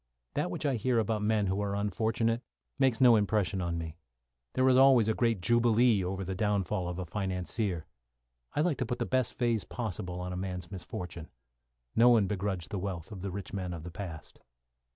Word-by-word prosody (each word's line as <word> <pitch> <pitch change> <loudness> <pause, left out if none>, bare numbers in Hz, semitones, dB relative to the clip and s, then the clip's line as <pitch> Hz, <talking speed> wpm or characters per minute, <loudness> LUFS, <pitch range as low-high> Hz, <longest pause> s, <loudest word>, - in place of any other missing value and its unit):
That - - 0
which 90 - -4
I 135 -4 +2
hear 125 +2 +1
about 110 -1 +1
men 105 -1 +2
who 95 +1 0
are 100 -1 -1
unfortunate 110 +3 0 0.4
makes 130 -3 +3
no 120 -2 +8
impression 100 -2 +1
on 85 -1 -2
me. 80 0 -5 0.6
There 130 0 +3
is 130 - +6
always 130 -4 +6
a 110 - +3
great 115 -4 +1
jubilee 120 -1 +4
over 95 +2 -3
the 95 +1 -3
downfall 100 -1 0
of 90 - -4
a 90 - -3
financier. 95 0 -2 0.7
I 150 - +2
like 155 -3 +1
to 130 - 0
put 120 - -2
the - - -1
best 130 -2 0
phase 115 -5 +1
possible 95 -4 -4
upon 90 0 -4
a - - -4
man's 90 -1 -5
misfortune. 90 -3 -7 0.7
No 120 +2 +7
one 115 -4 +5
begrudged 95 -4 -3
the 100 - -2
wealth 90 -4 -5
of 100 -3 -7
the 100 - -3
rich 95 +1 -6
men 90 -3 -3
of 80 - -8
the 90 - -7
past. 85 -4 -8
100 Hz, 200 wpm, -30 LUFS, 90-115 Hz, 0.7 s, no